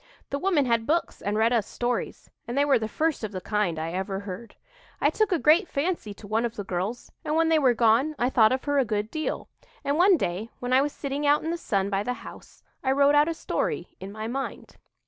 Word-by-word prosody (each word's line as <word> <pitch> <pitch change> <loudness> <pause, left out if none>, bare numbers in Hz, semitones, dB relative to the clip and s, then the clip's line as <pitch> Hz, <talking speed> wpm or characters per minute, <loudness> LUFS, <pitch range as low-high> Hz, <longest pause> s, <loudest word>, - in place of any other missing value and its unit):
The 280 - -1
woman 345 -6 +2
had 230 -2 +1
books 335 +2 0
and 205 +1 -1
read 225 +2 +3
us 225 -4 +1
stories, 245 0 -3 0.2
and 240 +3 -4
they 285 - +4
were 280 -4 +4
the 220 - -2
first 310 +3 -1
of 215 - -3
the 185 - -4
kind 210 -4 -1
I 160 +1 -3
ever 190 +2 -3
heard. 205 +3 -8 0.4
I - - +3
took 435 -2 +1
a 355 - +3
great 325 +5 +4
fancy 290 - -2
to 210 - -13
one 215 +3 0
of 235 -1 -2
the 205 - -4
girls; 195 +6 -4
and 300 - -1
when 325 0 +3
they 320 -1 +4
were 255 -4 +3
gone 240 +7 +3
I 245 +2 +1
thought 220 -4 +5
of 260 0 -1
her 285 -1 +1
a - - +4
good 210 -1 -2
deal, 310 0 -3 0.4
and 285 +3 0
one 370 0 +6
day, 190 - -3
when 245 +1 -2
I 260 - +6
was 290 +1 0
sitting 285 +1 -3
out 290 +1 +4
in 325 - -2
the - - -1
sun 200 - -1
by 195 0 +1
the 250 +4 -2
house, - - -12 0.2
I 265 - +2
wrote 280 +1 +4
out 295 +1 +5
a 330 - -2
story - - -2
in 190 +1 -7
my 215 +1 -6
mind. 265 +3 -5
245 Hz, 250 wpm, -26 LUFS, 210-290 Hz, 0.4 s, one